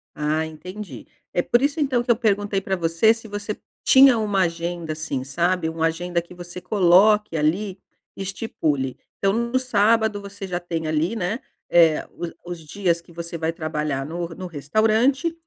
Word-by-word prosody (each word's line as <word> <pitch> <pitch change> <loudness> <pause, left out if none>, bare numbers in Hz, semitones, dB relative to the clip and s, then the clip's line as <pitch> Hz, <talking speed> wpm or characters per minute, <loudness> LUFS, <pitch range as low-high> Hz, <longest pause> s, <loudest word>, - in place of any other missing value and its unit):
Ah, 155 +1 0
entendi. 175 - -9 0.3
É 175 - +2
por 240 +7 +2
isso 285 +3 0
então 260 -5 +1
que 240 - +2
eu 235 - +5
perguntei 205 -3 +1
pra 190 0 -1
você 165 +5 +3
se 225 -1 -11
você 205 0 -5 0.3
tinha 265 -2 +7
uma 205 -3 +1
agenda, 170 -1 -2
assim, 155 -4 -3
sabe. 170 +5 0
Uma 160 0 0
agenda 170 +1 -2
que 175 - -15
você 175 0 -8
coloque 195 0 +4
ali 185 +6 0 0.4
e - - -7
estipule. 155 - -2 0.2
Então 195 - +2
no 235 +2 0
sábado 220 -3 +2
você 200 0 -8
já 180 -1 -2
tem 165 -2 -4
ali, 155 +7 0
né, 210 +4 -2 0.3
eh, 165 -3 +4
os 170 -1 -6
os 175 -1 -6
dias 170 +2 -1
que 170 - -19
você 170 0 -6
vai 165 0 -1
trabalhar 150 -4 -2
no 170 +3 -4
no 180 +2 -7
restaurante, 220 - +1
180 Hz, 175 wpm, -23 LUFS, 165-210 Hz, 0.4 s, tinha